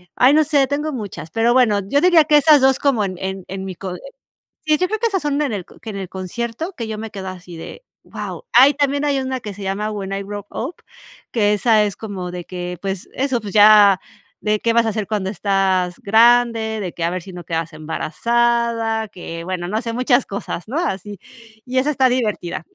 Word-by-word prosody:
ay, 255 +3 +5
no 310 +1 +5
sé, 290 -2 +3
tengo 290 +3 -2
muchas, 210 - -6
pero 230 +1 +2
bueno, 240 -5 +4
yo 285 +6 +2
diría 345 -4 +6
que 300 -1 +5
esas 300 0 +6
2 265 0 +4
como 255 -8 +2
en 190 - -3
en 190 -1 -5
en 190 +1 -6
mi 190 -1 -6
cole 180 0 -6 0.7
Sí, 310 -1 +3
yo 365 +4 +1
creo 435 +2 -2
que 470 - +2
esas 385 -7 -2
son 290 0 0
en 285 -4 0
el 190 -4 -4
c - - -17
que - - -8
en 200 - -5
el 190 - -5
concierto 235 - -5
que 230 -2 -4
yo 215 -1 -4
me 225 - -6
quedo 195 -3 -7
así 180 -2 -10
de: 165 - -10 0.2
"Wao". - - -7
Ah, 260 +3 +8
y 285 - 0
también 285 0 0
hay 280 -2 +1
una 260 0 -3
que 210 -3 -6
se 200 - -8
llama 195 +2 -2
"When 195 -2 -5
I 195 - -2
Grow 205 0 -7
Up", 275 +9 -4 0.6
que 210 -3 +2
esa 215 0 +3
es 205 -3 -2
como 190 -5 -6
de 175 -1 -7
que, 180 -1 -6
pues, 195 -2 -4
eso, 260 -3 -1
pues, 205 -3 -7
ya 205 -2 +7 0.4
de 210 0 +1
qué 230 +1 +1
vas 230 -1 +3
a - - +2
hacer 215 -1 -2
cuando 205 -3 -2
estás 190 -2 0
grande, 230 0 +3
de 185 -4 -4
que 170 - -5
a 170 - +1
ver 185 - -3
si 190 - -11
no 175 -1 -8
quedas 165 0 -3
embarazada, 230 +7 0
que, 175 -4 -8
bueno, 180 0 -4
no 215 +4 -1
sé, 230 0 -3
muchas 250 +1 +2
cosas, 200 -2 -5
¿no?, 260 +7 -3
así. 205 - -3 0.5
Y 255 +1 -3
esa 285 +3 +1
está 265 -3 +3
divertida, 215 -8 -2
215 Hz, 230 wpm, -20 LUFS, 190-255 Hz, 0.7 s, Ah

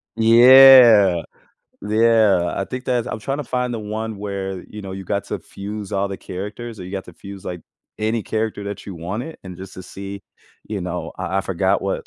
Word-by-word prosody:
Yeah. 115 -5 +8 0.6
Yeah, 110 -4 +3
I 100 - -2
think 125 +1 -6
that's 125 -2 0
I'm - - -4
trying 135 +6 -3
to 145 - -4
find 125 0 -2
the 115 - -3
one 110 0 -5
where, 95 -2 -5
you 105 -1 -9
know, 95 -1 -7
you 95 0 -6
got 100 +2 -2
to - - -4
fuse 100 0 -8
all 100 0 0
the 95 - -6
characters 105 +5 -7
or 90 - -8
you 90 - -9
got 95 -1 -5
to 90 - -13
fuse, 100 -1 -11
like, 90 -2 -6 0.4
any 110 +1 -1
character 110 -2 -3
that 100 -1 -6
you 100 - -8
wanted, 100 - -6
and 90 -2 -9
just 95 0 -10
to 95 - -9
see 100 +1 -8 0.5
you 105 -3 -3
know, 90 -2 -4
I 95 +2 -2
I - - +2
forgot 95 +1 0
what 95 - -3
100 Hz, 210 wpm, -21 LUFS, 95-110 Hz, 0.6 s, Yeah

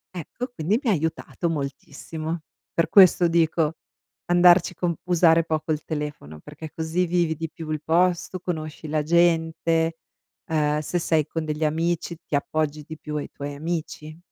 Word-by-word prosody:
Ecco, 180 - -5
quindi 180 +8 +1
mi 250 - 0
ha - - +4
aiutato 160 +1 -2
moltissimo. 155 +2 -5 0.3
Per 165 - +1
questo 185 -3 +7
dico 165 -1 +2 0.5
andarci 175 0 +5
con 175 -1 -1
usare 165 -2 +4
poco 155 -1 -2
il 155 0 -1
telefono, 150 - -5
perché 150 - -10
così 160 +3 0
vivi 170 -2 +1
di 160 +1 -5
più 160 +1 -9
il 155 -1 -2
posto, 175 +2 +1
conosci 155 -3 -5
la 150 0 0
gente, 165 0 +2 0.5
uhm, 150 -2 +1
se 155 +4 -2
sei 160 -3 +1
con 160 0 -3
degli 155 0 -2
amici 165 +2 -1
ti - - -2
appoggi 150 +1 -1
di 160 - -7
più 150 0 -5
ai 145 - -4
tuoi 145 0 -6
amici. 155 0 -5
160 Hz, 160 wpm, -24 LUFS, 155-170 Hz, 0.5 s, questo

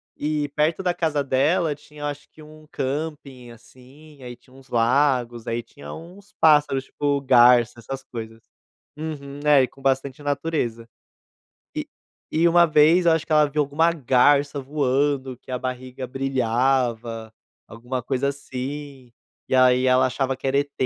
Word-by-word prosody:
e 150 0 -2
perto 150 +5 0
da 180 -2 0
casa 160 -4 -1
dela 145 +4 +1
tinha 150 +1 -16
eu - - -2
acho 145 0 -6
que 155 - -17
um 155 0 -15
camping, 140 -2 -5
assim, 130 +5 -17
aí 125 -1 -8
tinha 130 - -24
uns 135 0 -18
lagos, 120 -1 +1
aí 115 +1 -2
tinha 145 - -12
uns 190 +5 -13
pássaros 145 -4 +4
tipo 145 -1 -1
garça, 120 -2 +5
essas 135 +3 -7
coisas. 115 -3 -9 0.6
Uhum, 145 -3 -7
é 145 -2 +6
e 130 - 0
com 135 - -20
bastante 135 +1 -1
natureza. 140 -6 -2 0.8
E - - -4 0.5
e 165 +2 +3
uma 170 0 +5
vez 160 +3 +4
eu 165 - +6
acho 160 -1 0
que - - -31
ela 150 -1 +4
viu 150 +1 0
alguma 160 +4 +1
garça 140 0 +2
voando 135 -1 -1
que 130 - -11
a 125 - -1
barriga 130 0 -6
brilhava, 120 -3 -1 0.4
alguma 120 +3 -5
coisa 130 +2 -1
assim, 140 -1 -7 0.4
e - - -1
aí 130 0 +4
ela 130 0 +4
achava 135 +1 -1
que 130 - -29
era 135 +1 +2
ET, 145 0 -2
135 Hz, 160 wpm, -23 LUFS, 125-150 Hz, 0.8 s, é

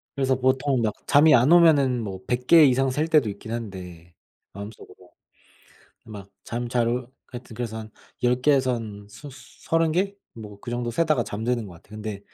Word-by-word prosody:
그래서 135 -1 +1
보통 130 0 +1
막 110 -2 0
잠이 150 +2 +6
안 125 +5 +4
오면은 145 -8 +5
뭐 95 -3 -6
100 125 0 -2
개 165 -2 +8
이상 135 0 +2
셀 150 +5 -1
때도 150 -9 +3
있긴 100 +2 -8
한데 90 -7 -8 0.4
마음속으로. 100 +2 -11 1.0
막 100 -3 -10 0.2
잠 120 +1 -4
잘 120 -1 +1
올 125 +1 -2 0.2
하여튼 120 -2 -10
그래서 110 -1 -5
한 110 -1 -9 0.3
10 125 +1 +2
개에서 130 -3 +3
한 105 -3 -8
스 145 +8 -12 0.4
30 165 -1 +1
개? 195 +4 0 0.2
뭐 105 -3 -11
그 120 - -8
정도 120 0 -3
세다가 155 -1 +1
잠드는 115 +2 -3
것 95 - -11
같아요. 105 +5 -14
근데 105 -2 -6
120 Hz, 295 characters per minute, -24 LUFS, 110-135 Hz, 1.0 s, 개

